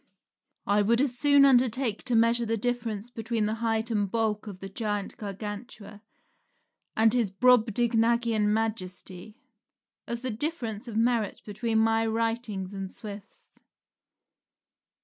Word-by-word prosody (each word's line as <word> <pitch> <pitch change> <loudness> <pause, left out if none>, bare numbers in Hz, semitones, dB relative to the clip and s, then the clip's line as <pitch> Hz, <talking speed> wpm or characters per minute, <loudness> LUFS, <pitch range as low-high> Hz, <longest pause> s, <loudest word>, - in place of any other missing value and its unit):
I 205 +1 +3
would 230 +3 +2
as 265 -2 +1
soon 285 +2 +5
undertake 250 -3 +2
to 245 - +1
measure 230 +1 +3
the 225 +1 0
difference 235 -1 -3
between 225 -1 -2
the 215 - -1
height 225 0 0
and 205 -3 0
bulk 220 0 -1
of 200 -3 -7
the 195 - -8
giant 205 0 -3
Gargantua 205 +1 -8 1.0
and 220 0 +5
his 235 -5 +1
Brobdignagian 230 0 +2
Majesty, 210 -2 -4 0.7
as 235 +1 -4
the 255 - -1
difference 230 -3 -3
of 225 -2 -4
merit 230 -3 0
between 220 +2 -2
my 225 0 +3
writings 225 -4 -2
and 195 -1 -5
Swift's. 205 -1 -10
225 Hz, 130 wpm, -27 LUFS, 210-235 Hz, 1.0 s, soon